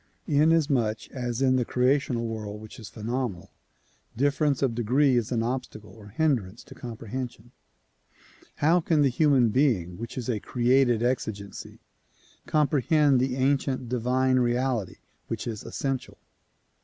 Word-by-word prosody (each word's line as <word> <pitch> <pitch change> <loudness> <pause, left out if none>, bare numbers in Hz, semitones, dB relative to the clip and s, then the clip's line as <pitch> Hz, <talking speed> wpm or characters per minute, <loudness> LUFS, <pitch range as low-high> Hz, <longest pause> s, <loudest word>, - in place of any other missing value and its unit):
Inasmuch 145 -8 +2
as 125 -1 -3
in 130 -1 +3
the 125 - +2
creational 125 -1 +1
world 105 -2 -5
which 110 +2 -11
is 110 - -9
phenomenal, 115 -4 -4 0.7
difference 140 +1 +1
of 130 -4 +1
degree 125 +4 +2
is 120 -1 0
an 115 -2 0
obstacle 120 -3 -5
or 110 -2 -14
hindrance 115 -4 -1
to - - -13
comprehension, 120 0 -7 1.0
how 165 +4 +3
can 160 -3 +2
the 140 - +4
human 130 -3 +3
being 105 - +1
which 115 +2 -7
is 125 - -4
a 115 -4 -1
created 120 -1 +2
exigency 110 -5 -3 0.7
comprehend 150 -2 +3
the 130 0 0
ancient 130 -2 0
divine 130 +2 +1
reality 120 -5 0 0.3
which 115 -1 -4
is 110 -4 -5
essential 135 -2 -4
125 Hz, 130 wpm, -26 LUFS, 115-135 Hz, 1.0 s, the